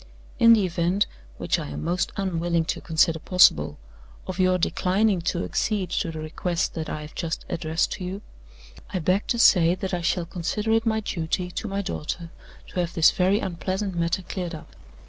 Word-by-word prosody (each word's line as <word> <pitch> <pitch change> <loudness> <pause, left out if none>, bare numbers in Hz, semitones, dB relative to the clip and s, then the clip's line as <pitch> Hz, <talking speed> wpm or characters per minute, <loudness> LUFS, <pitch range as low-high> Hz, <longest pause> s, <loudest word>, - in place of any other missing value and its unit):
In 230 -1 +8
the 210 -4 +3
event 175 +3 +1 0.3
(which - - 0
I - - -5
am 75 +1 -6
most 180 +2 0
unwilling 170 -3 0
to - - -3
consider 160 0 +2
possible) 80 - +4 0.5
of 185 0 -6
your 185 0 +4
declining 190 +2 +1
to 175 - -2
accede 205 -4 -1
to 170 - -1
the 160 -1 -6
request 165 +3 -2
that 160 -2 -4
I 155 - -4
have 150 0 -10
just 165 -1 -4
addressed 160 0 -1
to - - -5
you, 190 +3 -5 0.7
I - - -2
beg 185 +4 +1
to 235 - 0
say 175 -6 +5
that 190 0 -5
I 175 - -1
shall 170 0 0
consider 185 +5 -2
it 225 +1 +2
my 220 0 +1
duty 180 -1 -2
to 220 - -4
my 200 0 -2
daughter 170 -2 -4 0.4
to - - -4
have 175 -1 -2
this 160 -1 +6
very 190 +3 +2
unpleasant 190 +2 -3
matter 170 +2 -1
cleared 180 -2 -4
up. 155 - -12
180 Hz, 190 wpm, -25 LUFS, 165-195 Hz, 0.7 s, In